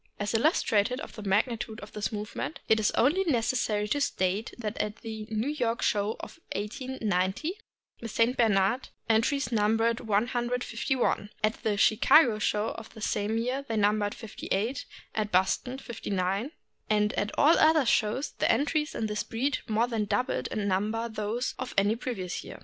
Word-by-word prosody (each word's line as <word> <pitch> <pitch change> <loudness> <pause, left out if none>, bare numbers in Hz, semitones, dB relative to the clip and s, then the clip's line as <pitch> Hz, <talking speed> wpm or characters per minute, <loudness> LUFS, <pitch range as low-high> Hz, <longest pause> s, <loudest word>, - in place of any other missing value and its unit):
As 205 +1 -2
illustrative 230 - +2
of - - -8
the 215 - -8
magnitude 220 +3 0
of - - -10
this 210 - -3
movement, 215 +8 -4
it 220 - +4
is 210 - +3
only 310 +11 +3
necessary 230 - +1
to 290 +5 0
state 195 -4 0
that 220 -3 -4
at 210 0 -1
the 220 -2 -6
New 220 +5 -1
York 235 -6 -1
show 210 0 +1
of - - -10 0.2
1890 215 - -2 0.4
the 230 - -6
St. 230 +3 +2
Bernard 215 +1 +2 0.2
entries 245 +6 +2
numbered 225 +1 +2
151; 240 +1 0
at 215 +1 +1
the 210 -2 0
Chicago 220 +3 +5
show 210 0 0
of 225 - -8
the 220 - -10
same 210 +1 0
year 250 +4 -1
they 225 - -1
numbered 205 0 +2
58; 225 +4 -3 0.3
at 215 -1 -2
Boston, 190 +8 +1
59; 200 -3 -2 0.4
and 210 0 +2
at 205 - -1
all 300 +3 +6
the - - +3
other 310 -2 +5
shows 230 +4 +1
the - - +1
entries 300 +5 0
in 225 - -1
this 210 0 -1
breed 260 +5 -1
more 225 +2 +2
than 225 -3 -1
doubled 250 +5 -1
in 205 -1 -2
num 200 +2 +1
ber 225 +1 -2
those 220 +3 -2
of 255 0 -5
any 205 +2 +3
previous 225 -7 -4
year. - - -9
225 Hz, 170 wpm, -28 LUFS, 210-250 Hz, 0.4 s, all